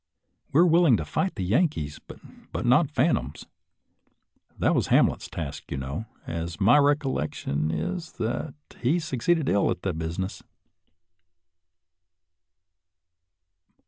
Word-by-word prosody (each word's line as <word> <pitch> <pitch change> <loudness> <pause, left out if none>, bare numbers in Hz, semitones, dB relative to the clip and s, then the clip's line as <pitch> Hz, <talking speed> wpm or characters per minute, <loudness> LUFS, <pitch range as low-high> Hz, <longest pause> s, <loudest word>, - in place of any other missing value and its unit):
We 145 - +3
are - - +6
willing 165 -7 +5
to 75 - -4
fight 190 - -1
the 95 - -3
Yankees, 95 - 0
but - - -9
not 130 +5 +4
phan 150 +2 +2
toms; 65 +4 -4 1.1
that - - +2
was - - +1
Hamlet's - - +3
task, 75 -4 -6
you 70 - -3
know, 70 +11 -5 0.2
and 85 +2 -5
my 115 +8 +6
recollection 135 - 0
is 85 - -3
that 120 +6 -3 0.2
he 135 +8 +2
succeeded 155 +1 0
ill 100 - +2
at 90 - -3
the 95 - -1
busi 80 +1 -4
ness. 95 +1 -4
110 Hz, 125 wpm, -26 LUFS, -, 1.1 s, are